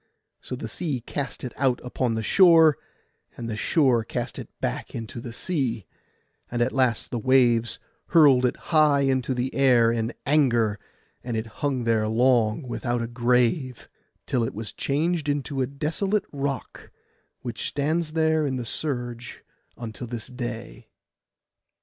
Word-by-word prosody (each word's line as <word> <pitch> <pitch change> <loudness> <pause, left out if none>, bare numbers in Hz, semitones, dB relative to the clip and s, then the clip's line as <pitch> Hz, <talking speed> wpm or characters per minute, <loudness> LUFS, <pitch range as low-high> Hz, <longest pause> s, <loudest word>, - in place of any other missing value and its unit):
So 125 - -5
the 120 - -6
sea 145 +3 -3
cast 135 +3 -5
it 125 - -5
out 130 -3 +2
upon 125 -1 -1
the 110 - -2
shore, 165 - +6 0.6
and 115 - -5
the 110 - -3
shore 125 0 +2
cast - - -4
it - - -8
back - - -4
into 115 +1 -6
the 120 - -7
sea, 120 - -2 0.6
and 120 - -3
at 125 - -1
last 130 -4 +1
the 120 - -2
waves 120 -1 +3 0.3
hurled 145 -7 +6
it - - -3 0.2
high 150 -3 +5
into 130 -1 +1
the 125 +2 -2
air 125 -4 +4
in 115 0 -1
anger; 120 -8 +2 0.4
and 120 -2 -3
it 110 - -2 0.2
hung 135 -4 0
there 110 -2 +1
long 115 +1 +2
without 120 -1 -2
a - - -3
grave, 125 +2 +1 0.4
till 125 - 0
it 115 - -3
was 110 +1 -6
changed 155 +2 -1
into 145 -1 -1
a 130 - +1
desolate 160 +9 -1
rock, 140 -1 -4 0.5
which 120 -2 -4
stands 155 +2 -1
there 160 -1 +2
in 130 - -2
the 125 -2 -4
surge 120 -3 -4 0.3
until 120 +1 -7
this 115 -1 -6
day. 120 -2 -7
125 Hz, 155 wpm, -25 LUFS, 115-145 Hz, 0.6 s, shore